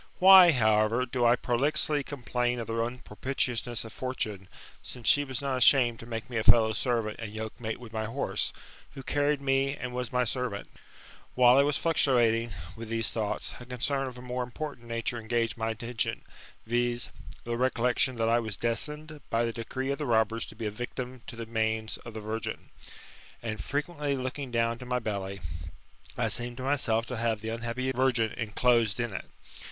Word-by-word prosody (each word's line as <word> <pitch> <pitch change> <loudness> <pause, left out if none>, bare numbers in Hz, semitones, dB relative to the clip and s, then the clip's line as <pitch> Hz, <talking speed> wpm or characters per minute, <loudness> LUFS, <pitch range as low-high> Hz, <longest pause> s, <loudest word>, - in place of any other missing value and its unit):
Why, 185 -2 +9
however, 110 -1 +3
do 120 -1 0
I 120 - +6
prolixly 145 +4 +2
complain 125 -3 -2
of 115 - -3
the 115 - -4
unpropitiousnesss 120 0 -2
of 110 - -9
Fortune; 110 -7 -4 0.3
since 125 -3 -8
she 145 -2 +6
was 135 -1 -5
not 135 -2 0
ashamed 125 -2 +5
to 115 - -10
make 115 0 -5
me 120 -3 -4
a 110 - 0
fellow 110 -1 +6
servant 115 -2 -1
and 110 -2 -5
yokemate 110 +1 -5
with 120 -2 -11
my 110 0 -2
horse, 125 +6 -1 0.4
who 135 - -7
carried 145 0 +1
me 135 +1 +1
and 125 -1 -5
was 125 -2 -3
my 125 0 +2
servant? 125 -4 -3 0.6
While 125 0 +7
I - - +8
was 145 0 +2
fluctuating 120 -8 +2 0.2
with 115 -1 -8
these 115 -1 0
thoughts, 110 -3 -2
a 120 - -10
concern 135 +2 -1
of 125 -1 -8
a 125 - -10
more 125 0 -3
important 125 0 -6
nature 115 +1 -2
engaged 115 0 -1
my 115 -1 -2
attention, 115 +1 -2 0.4
viz. 120 0 0 0.3
the 120 - -6
recollec 125 0 +1
tion 130 -2 +2
that 115 -1 0
I 115 +1 +4
was 110 -4 -4
destined 150 +6 -3
by 115 +1 +2
the 115 - -2
decree 130 +4 -3
of 140 - -3
the 150 - -2
robbers 115 0 +2
to - - -12
be 110 0 -5
a 105 - -1
victim 125 +3 -6
to - - -7
the 115 0 -6
manes 110 -1 -1
of 115 -2 -11
the 110 - -5
virgin; 110 +2 -4 0.7
and 110 -2 -4
frequently 145 -1 -2
looking 130 +1 -4
down 115 0 0
to 125 - -8
my 125 0 +1
belly, 100 -4 -4 0.8
I - - +1
seemed 120 0 0
to 130 - -5
myself 130 -5 +1
to 125 0 -5
have 110 -2 0
the 110 - -4
unhappy 120 +3 -2
virgin 125 -4 +2
enclosed 115 -1 +1
in 120 -3 -2
it. - - -5
120 Hz, 190 wpm, -29 LUFS, 115-130 Hz, 0.8 s, Why